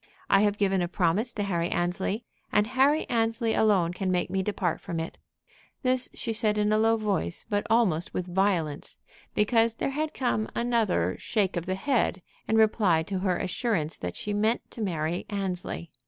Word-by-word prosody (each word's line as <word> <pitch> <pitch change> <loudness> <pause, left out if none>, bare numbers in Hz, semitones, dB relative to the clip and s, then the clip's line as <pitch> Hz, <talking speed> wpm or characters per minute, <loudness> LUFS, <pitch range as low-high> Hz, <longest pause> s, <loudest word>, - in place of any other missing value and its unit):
I 195 - +6
have 205 -1 +2
given 195 -2 +1
a 175 - 0
promise 185 +6 +1
to 205 - -2
Harry 175 -3 -1
Annesley, 185 +6 -1 0.3
and 210 0 +3
Harry 270 +6 +2
Annesley 230 -1 0
alone 190 -6 +3
can 185 0 -2
make 180 -1 0
me 190 - 0
depart 185 -4 -1
from 165 - -4
it." 165 - -6 0.6
This 255 0 +2
she 230 - -2
said 215 -1 +2
in 210 0 +2
a 215 - +3
low 225 +1 +3
voice, 200 - 0
but 205 -1 -1
almost 190 -8 +2
with 180 - -3
violence, 180 -5 -1 0.4
because 225 +2 +3
there 275 - -2
had 305 +2 -3
come 230 -4 0
another 220 - +1
shake 200 -4 0
of 175 0 -3
the 185 - 0
head 195 -4 0 0.2
in 220 - +2
reply 210 -7 +3
to 190 +2 -3
her 185 -1 0
assurance 185 -5 -1
that 90 0 -4
she 210 - -3
meant 215 +3 0
to 230 - -7
marry 170 -3 -2
Annesley. 185 -4 -4
205 Hz, 185 wpm, -27 LUFS, 175-225 Hz, 0.6 s, I